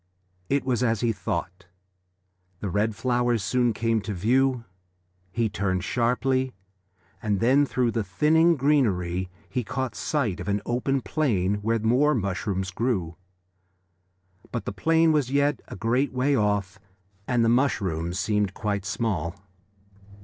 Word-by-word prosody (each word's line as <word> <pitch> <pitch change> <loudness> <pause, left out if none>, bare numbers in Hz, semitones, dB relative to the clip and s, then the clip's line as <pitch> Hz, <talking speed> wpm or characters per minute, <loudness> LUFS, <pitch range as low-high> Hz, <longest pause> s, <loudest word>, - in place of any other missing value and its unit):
It 140 -1 +1
was 125 -2 0
as 115 -4 +1
he 120 - +2
thought: 90 -1 -4 0.9
the 100 - -3
red 105 +2 0
flowers 120 -1 +1
soon 120 +3 +2
came 115 0 0
to 105 0 -4
view. 125 +6 +2 0.7
He 115 +3 0
turned 95 -3 -1
sharply, 130 +4 0 0.7
and 105 -3 0
then 135 +5 +4
through 125 -3 +1
the 115 -1 -1
thinning 155 - +3
greenery 95 - +1 0.2
he 125 - -2
caught 130 +3 -3
sight 125 - -1
of - - -6
an 100 0 +1
open 130 +3 0
plain 105 -4 0
where 115 +2 +1
more 125 +7 +3
mushrooms 95 -2 -2
grew. 95 -6 -1 1.4
But 120 - -4
the - - -3
plain 165 0 +3
was 150 -5 +2
as 130 - -6
yet 145 0 +2
a - - -8
great 120 +7 0
way 130 +3 +1
off, 105 -4 0 0.5
and 120 -2 +2
the - - +3
mushrooms 95 - 0
seemed 105 -1 0
quite 100 -3 -2
small. 95 -5 -2
115 Hz, 140 wpm, -25 LUFS, 100-130 Hz, 1.4 s, then